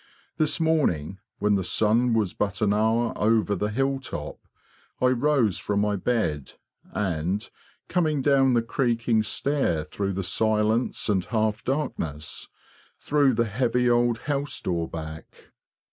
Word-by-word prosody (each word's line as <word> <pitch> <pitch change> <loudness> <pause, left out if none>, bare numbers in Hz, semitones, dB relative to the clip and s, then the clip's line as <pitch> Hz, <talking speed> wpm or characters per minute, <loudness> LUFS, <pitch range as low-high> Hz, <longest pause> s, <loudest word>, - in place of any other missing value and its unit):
This 155 +1 +1
morning, 100 - +1 0.2
when 105 0 +1
the 95 -2 +1
sun 115 +5 +2
was 105 -5 0
but 105 0 -2
an 100 -1 +3
hour 110 +2 +1
over 110 -1 +2
the 105 +3 -1
hilltop, 135 +3 -3 0.6
I 125 - +3
rose 125 -5 +2
from 105 -1 -1
my 105 0 +1
bed, 95 - -1 0.4
and, 95 +2 -2 0.4
coming 155 -6 0
down 135 -2 +4
the 115 - +2
creaking 115 -2 +1
stair 110 - 0
through 100 +4 -3
the 95 +1 -3
silence 110 +4 0
and 100 -4 +1
half 110 -1 -1
darkness, 80 - -3 0.5
threw 140 -4 +2
the 115 +1 +2
heavy 120 +2 +1
old 120 -1 +2
house 145 0 -1
door 85 -2 -2
back. 80 -1 -9
110 Hz, 135 wpm, -25 LUFS, 100-130 Hz, 0.6 s, down